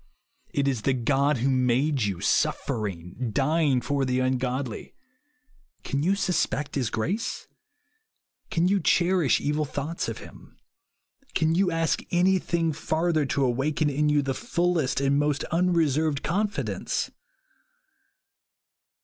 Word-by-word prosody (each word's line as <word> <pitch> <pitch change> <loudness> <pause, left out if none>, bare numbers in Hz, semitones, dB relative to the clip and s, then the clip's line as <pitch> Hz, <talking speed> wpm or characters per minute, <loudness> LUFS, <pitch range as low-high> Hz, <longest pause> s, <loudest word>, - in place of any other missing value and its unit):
It 140 -1 0
is 130 -5 0
the 135 +3 +1
God 135 +4 +1
who 130 +4 +1
made 130 +3 +2
you, 100 -5 -1
suffer 110 -2 0
ing, 90 +6 -6
dying 140 0 +2
for 140 +1 -1
the 130 -1 0
ungodly. 130 -1 -2 0.9
Can 140 - -2
you 185 +6 +2
sus 185 -3 +1
pect 150 0 -4
his 130 -5 -1
grace? 180 - -3 1.0
Can 170 +1 +1
you 200 +1 +2
cherish 175 -3 +3
evil 150 +1 0
thoughts 145 +4 -3
of - - -5
him? - - -14 0.8
Can 160 -1 +2
you 185 +2 +2
ask 165 -1 0
anything 175 -2 +1
farther 160 0 0
to 135 +1 +1
awaken 145 +4 0
in 150 +2 +1
you 145 -1 +3
the 135 0 -1
fullest 175 - 0
and 140 +1 +2
most 145 -1 0
unreserved 160 -4 +1
confidence 205 +5 -2
145 Hz, 130 wpm, -26 LUFS, 130-165 Hz, 1.0 s, cherish